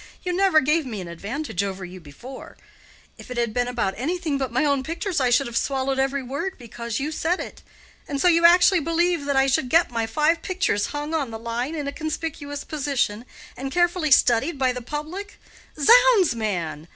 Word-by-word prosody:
You 360 Hz, -, -2 dB
never 370 Hz, -4 st, +4 dB
gave 305 Hz, +3 st, +2 dB
me 230 Hz, -6 st, -6 dB
an 180 Hz, -, -7 dB
advantage 200 Hz, -, -4 dB
over 190 Hz, -1 st, -4 dB
you 185 Hz, +1 st, -10 dB
before. 180 Hz, -, -11 dB, 0.6 s
If -, -, -12 dB
it 250 Hz, -, -6 dB
had 235 Hz, -2 st, 0 dB
been 245 Hz, +1 st, 0 dB
about 235 Hz, -6 st, -1 dB
anything 310 Hz, +2 st, -2 dB
but 265 Hz, -3 st, -2 dB
my 255 Hz, +6 st, +1 dB
own 280 Hz, -2 st, +2 dB
pictures, 335 Hz, +4 st, -3 dB
I 255 Hz, -2 st, +2 dB
should 275 Hz, +3 st, +3 dB
have 235 Hz, -, -7 dB
swallowed 270 Hz, +1 st, 0 dB
every 270 Hz, 0 st, 0 dB
word 285 Hz, +9 st, -4 dB
because 235 Hz, -1 st, -5 dB
you 295 Hz, +3 st, -3 dB
said 335 Hz, +3 st, -1 dB
it. -, -, -8 dB, 0.5 s
And 280 Hz, -1 st, -3 dB
so 360 Hz, -, +3 dB
you 335 Hz, -1 st, +4 dB
actually 355 Hz, +2 st, +6 dB
believe 335 Hz, 0 st, 0 dB
that 280 Hz, -1 st, 0 dB
I 270 Hz, 0 st, +4 dB
should 265 Hz, -1 st, +1 dB
get 330 Hz, -2 st, +3 dB
my 230 Hz, -1 st, -1 dB
five 305 Hz, +7 st, +1 dB
pictures 365 Hz, -, 0 dB
hung 295 Hz, +2 st, -5 dB
on 290 Hz, -6 st, -1 dB
the 225 Hz, -, -6 dB
line 235 Hz, +6 st, -3 dB
in 295 Hz, -3 st, -4 dB
a -, -, -2 dB
conspicuous 290 Hz, -2 st, -5 dB
position, 265 Hz, -7 st, -2 dB, 0.3 s
and 270 Hz, +1 st, -5 dB
carefully 350 Hz, -1 st, +1 dB
studied 265 Hz, +3 st, +3 dB
by 260 Hz, -1 st, +2 dB
the 250 Hz, -, -6 dB
public? 305 Hz, -, -6 dB, 0.4 s
Zounds, 465 Hz, -, +6 dB
man! 175 Hz, -9 st, -3 dB
275 Hz, 200 wpm, -23 LUFS, 240-325 Hz, 0.6 s, actually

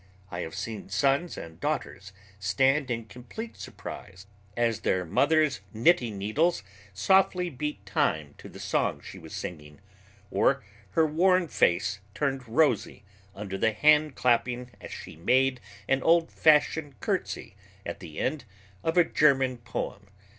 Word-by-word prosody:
I 85 Hz, -, -4 dB
have 80 Hz, -2 st, -5 dB
seen 110 Hz, -4 st, -5 dB
sons 135 Hz, -, +1 dB
and 80 Hz, -1 st, -9 dB
daughters -, -, -3 dB, 0.3 s
stand 130 Hz, +9 st, +2 dB
in 115 Hz, -2 st, -2 dB
complete 125 Hz, -, -9 dB
surprise 95 Hz, +1 st, -9 dB, 0.3 s
as 115 Hz, -2 st, +1 dB
their 95 Hz, -1 st, 0 dB
mother's 155 Hz, -, +2 dB
knitting 120 Hz, -, +3 dB
needles 110 Hz, -, +1 dB, 0.3 s
softly 180 Hz, -, +2 dB
beat 135 Hz, -6 st, -5 dB
time 80 Hz, -7 st, 0 dB
to -, -, -10 dB
the -, -, -12 dB
song -, -, 0 dB
she -, -, -10 dB
was -, -, -12 dB
singing, 75 Hz, -3 st, -7 dB, 0.5 s
or 135 Hz, -1 st, +2 dB, 0.3 s
her 160 Hz, -, +6 dB
worn 180 Hz, +3 st, +3 dB
face 100 Hz, -, +1 dB, 0.2 s
turned 135 Hz, -3 st, -1 dB
rosy 135 Hz, -5 st, +1 dB, 0.3 s
under 100 Hz, -1 st, -5 dB
the 110 Hz, -, +2 dB
hand 150 Hz, +4 st, +4 dB
clapping 125 Hz, 0 st, +1 dB
as -, -, -8 dB
she -, -, -8 dB
made 130 Hz, +9 st, +2 dB, 0.3 s
an 135 Hz, 0 st, +2 dB
old 165 Hz, +2 st, +3 dB
fashioned 150 Hz, -3 st, +3 dB
curtsy -, -, -3 dB, 0.3 s
at -, -, -5 dB
the 75 Hz, -, -10 dB
end 140 Hz, +1 st, -1 dB, 0.4 s
of 165 Hz, +2 st, 0 dB
a 175 Hz, -, +8 dB
German 135 Hz, -5 st, +3 dB
poem. 115 Hz, -3 st, -5 dB
125 Hz, 140 wpm, -28 LUFS, 100-150 Hz, 0.5 s, a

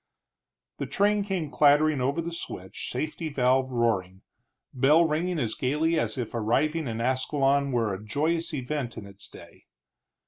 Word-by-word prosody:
The -, -, -3 dB
train 205 Hz, +1 st, +2 dB
came 185 Hz, -7 st, -3 dB
clattering 145 Hz, -1 st, +4 dB
over 140 Hz, +6 st, 0 dB
the 170 Hz, -, -4 dB
switch, 95 Hz, -, -6 dB
safety 155 Hz, +5 st, -3 dB
valve 130 Hz, -1 st, +2 dB
roaring, 100 Hz, -6 st, -1 dB, 0.5 s
bell 150 Hz, +6 st, +4 dB
ringing 165 Hz, +3 st, -1 dB
as 115 Hz, -7 st, -1 dB
gaily 155 Hz, +5 st, 0 dB
as -, -, -1 dB
if 120 Hz, -4 st, -4 dB
arriving 135 Hz, +8 st, 0 dB
in 115 Hz, -1 st, -4 dB
Ascalon 135 Hz, +3 st, +1 dB
were 115 Hz, -5 st, 0 dB
a 95 Hz, +2 st, -7 dB
joyous 155 Hz, +9 st, -1 dB
event 135 Hz, -3 st, -4 dB
in 105 Hz, -, -7 dB
its 100 Hz, 0 st, -11 dB
day. -, -, -15 dB
140 Hz, 150 wpm, -27 LUFS, 120-155 Hz, 0.5 s, clattering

